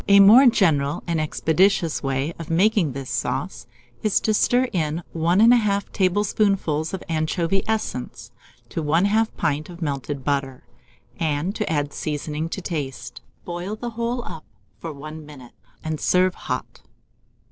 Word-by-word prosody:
A 200 0 +7
more 225 +7 +8
general 155 - +2
and 170 -2 0
expeditious 165 +2 +1
way 135 +3 -1
of 165 - -7
making 180 -3 +2
this 135 -1 -6
sauce - - -3 0.3
is 215 -2 +2
to 215 - +1
stir 245 +4 +3
in 160 -1 -1
1 170 +3 +2
1/2 215 -4 +4
tablespoonfuls 195 -5 +1
of 190 - -5
anchovy 165 +4 0
essence 215 - -3 0.4
to 165 - -3
1/2 200 +9 +2
pint 150 +3 -1
of 175 -1 -10
melted 140 -3 -3
butter, 140 -2 -2 0.6
and 160 +3 -1
to 210 - -2
add 145 -2 -1
seasoning 150 +1 -3
to 190 - -5
taste. 135 -8 -5 0.2
Boil 175 +4 -4
the 240 +2 -5
whole 235 +2 -2
up 160 - -8 0.3
for 165 - -6
1 155 +2 -9
minute, 135 -6 -13 0.3
and 155 -1 -3
serve 185 0 +3
hot. - - -5
165 Hz, 145 wpm, -23 LUFS, 150-200 Hz, 0.6 s, more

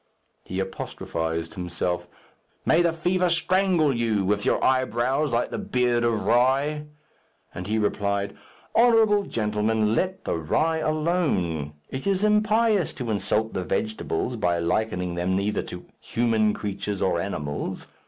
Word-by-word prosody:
He 95 - -4
apostrophized 80 -3 -3
himself, 90 -1 -2 0.6
"May 160 - +4
the 170 -1 +3
fever 180 +2 +1
strangle 175 -4 +2
you, 110 -4 +1
with 100 +1 0
your - - +1
eyebrows 130 +3 +1
like 120 +1 0
the - - -3
beard 120 -1 +1
of 115 -2 0
rye." 140 +5 +2 0.7
And 90 +1 -6
he 110 +1 0
replied, 100 -1 -1 0.4
"Honourable 225 -3 +5
gentlemen, 105 0 0
let 185 +9 -1
the - - -1
rye 160 - +1
alone. 155 - 0 0.2
It 130 +7 -4
is 195 0 +1
impious 215 -2 +3
to 120 -4 -4
insult 105 +2 0
the 95 - -2
vegetables, 110 +3 -2
by 90 -5 +1
likening 90 +1 -1
them 90 +2 0
either 105 +2 0
to - - -9
human 110 -2 +1
creatures 100 -1 -3
or 85 -2 +1
animals. 75 -6 -4
110 Hz, 135 wpm, -25 LUFS, 95-155 Hz, 0.7 s, Honourable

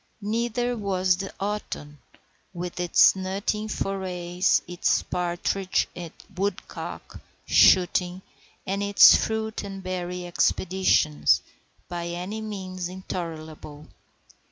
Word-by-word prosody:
Neither 240 +3 -1
was 190 -4 +1
the 195 0 -5
autumn, 195 -8 -4 0.6
with 175 0 -5
its 175 +1 +5
nutting 195 +3 -2
forays, 185 -3 0
its 175 0 +1
partridge 180 +2 -1
and 175 -3 -7 0.2
woodcock 195 0 -5 0.3
shooting, 180 0 +4 0.4
and 200 +1 -2
its 200 0 +8
fruit 220 0 -2
and 195 -1 -7
berry 180 -1 -4
expeditions, 175 -3 +2 0.4
by 170 -1 -4
any 180 +5 -5
means 185 -4 -5
intolerable. 160 -5 -7
185 Hz, 95 wpm, -25 LUFS, 175-200 Hz, 0.6 s, its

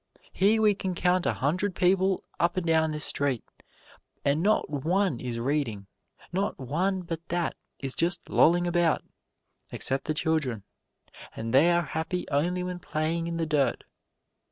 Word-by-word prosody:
Here 210 +3 +3
we 210 -1 +5
can 190 -2 -4
count 180 0 +2
a - - +2
hundred 180 +8 -1
people 190 +1 +2 0.2
up 175 +1 +1
and 185 - -1
down 160 -1 +3
this 150 -1 +1
street, 140 -5 +1 0.8
and 140 +3 +2
not 215 +4 +2
one 155 +1 0
is 120 -2 -4
reading, 120 -5 -1 0.5
not 195 +3 -1
one 180 +9 -1
but 165 -2 -5
that 175 -1 -1 0.2
is 135 -1 -2
just 175 +1 0
lolling 175 +2 +4
about, 175 -2 +2 0.7
except 135 +1 -2
the 155 - -1
children 150 -9 -1 0.7
and 115 +1 -4
they 145 +6 +6
are 175 0 +3
happy 160 +4 -3
only 175 +6 +1
when 180 0 -4
playing 165 0 -2
in 170 0 -3
the 165 - 0
dirt. 150 -3 +1
165 Hz, 155 wpm, -27 LUFS, 145-180 Hz, 0.8 s, they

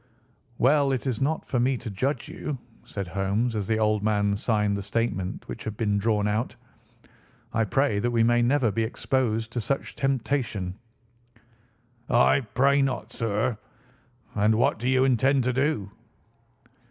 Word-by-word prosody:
"Well, 140 +2 +3
it 130 - -2
is 130 -3 -1
not 155 +4 0
for 125 - -1
me 130 +2 +2
to 110 - -7
judge 130 +9 -2
you," 150 -3 -5 0.3
said 100 -3 -5
Holmes 100 +6 0
as 100 -3 -2
the 110 - +1
old 110 -1 +2
man 105 -1 +1
signed 105 -1 +1
the 100 - -3
statement 100 -2 -2
which - - -7
had 110 -1 -5
been 105 -3 +1
drawn 105 -1 +1
out. 105 +3 -1 1.0
"I 115 -1 +2
pray 120 0 +1
that 120 - 0
we 115 -1 +2
may 120 +1 +3
never 120 -1 +2
be 115 - -1
exposed 115 -1 -1
to 120 - -2
such 135 +6 -2
a - - -29
temptation." 120 -8 -1 1.4
"I 120 - +5 0.2
pray 140 +2 +4
not, 130 -4 -2
sir. 115 0 0 0.8
And 105 +1 +3
what 130 +2 +2
do 120 +2 -1
you 130 0 +4
intend 135 +1 +3
to 125 +1 0
do?" 130 -7 0
115 Hz, 165 wpm, -26 LUFS, 105-130 Hz, 1.4 s, I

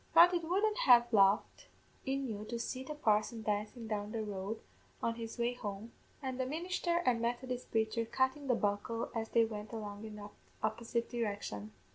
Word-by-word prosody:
Throth 345 +2 +9
it 345 -1 +1
wouldn't 415 +6 +1
lave 240 -1 +9
a - - +3
laugh 195 0 +6 0.6
in 270 0 0
you 210 -2 -4
to 235 +2 -4
see 255 +3 -3
the 300 +3 -6
parson 220 -3 +1
dancin' 210 +3 -2
down 210 -1 -2
the 220 -1 -2
road 205 +1 -4 0.4
on 230 - +2
his 230 -1 -6
way 240 +1 +1
home, 210 -1 -6 0.3
and 260 -1 -3
the 260 - +1
ministher 345 +3 0
and 235 -2 +3
Methodist 245 +1 -2
praicher 225 +1 0
cuttin' 265 +2 +1
the 250 - +4
buckle 215 +3 -1
as 225 -1 -2
they 230 -1 +4
went 215 -1 -6
along 210 -2 -6
in 215 -1 -7
the 205 0 -8 0.3
opposite 230 +2 -1
direction. 200 - -3
230 Hz, 185 wpm, -34 LUFS, 210-255 Hz, 0.6 s, Throth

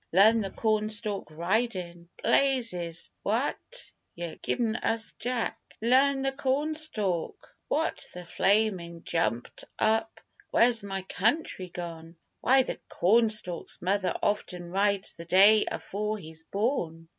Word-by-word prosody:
Learn 220 +5 +6
the 195 - -3
cornstalk 215 -1 -1
ridin'! 175 0 -2
Blazes! 230 -12 +1
w'at - - -2 0.2
yer 170 -1 -5
giv'n' 225 -3 0
us, - - -8
Texas 225 0 0
Jack? 245 -1 -2 0.2
Learn 270 +4 +3
the 270 - +1
cornstalk 275 - 0
what 320 +2 0
the 180 0 -9
flamin', 185 -3 +1
jumptup! 175 - -1 0.4
where's 230 -2 +3
my 195 -1 -4
country 195 - -1
gone? 170 -1 -8 0.2
Why, 265 +1 +4
the - - -5
cornstalk's 215 -3 +2
mother 190 +1 0
often 180 -4 -2
rides 200 0 +1
the 170 - -10
day 200 +5 +6
afore 210 +2 -3
he's 160 -3 -9
born! 175 - -2
205 Hz, 115 wpm, -28 LUFS, 175-230 Hz, 0.4 s, Learn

